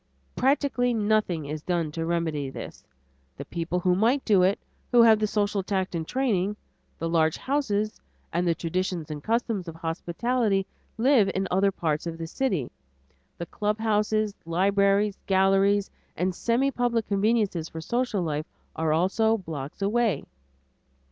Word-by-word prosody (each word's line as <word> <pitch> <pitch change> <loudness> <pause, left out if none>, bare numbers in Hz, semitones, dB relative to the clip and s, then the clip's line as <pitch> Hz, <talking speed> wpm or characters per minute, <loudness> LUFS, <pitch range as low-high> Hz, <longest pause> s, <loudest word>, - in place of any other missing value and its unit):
Practically 265 -2 +1
nothing 210 -7 +1
is 150 +1 -5
done 170 -2 -1
to 165 +1 -3
remedy 160 -5 -1
this. - - -9 0.5
The - - -6
people 170 +1 -2
who 180 0 +2
might 235 +9 +2
do 200 -4 +4
it, 190 +2 +3 0.3
who 240 -1 +7
have 220 -2 +6
the 215 - +1
social 205 -1 0
tact 190 -1 -2
and 165 -2 -3
training, 210 -7 0 0.4
the 165 - -3
large 160 -1 +2
houses, 215 -7 -1 0.3
and 175 +1 +1
the 170 - +2
traditions 170 -2 -3
and 150 -1 -6
customs 225 -5 -1
of 165 - -7
hospitality, 195 +6 -1 0.3
live 235 -4 +4
in 190 0 0
other 195 +2 +3
parts 160 -3 -2
of 165 -1 -5
the 165 - -5
city. 175 - -2 0.7
The 170 - -4
club 210 +5 -2
houses, 215 -1 +1
libraries, 200 +4 +2
galleries, 195 +1 +3 0.3
and 185 +1 0
semi 240 +8 +1
public 240 -3 0
conveniences 200 -5 +1
for 160 - -7
social 235 +2 -1
life 155 -1 -2 0.3
are 160 -1 0
also 200 +7 +2
blocks 160 -2 -6
away. 215 -5 +1
195 Hz, 150 wpm, -26 LUFS, 165-220 Hz, 0.7 s, who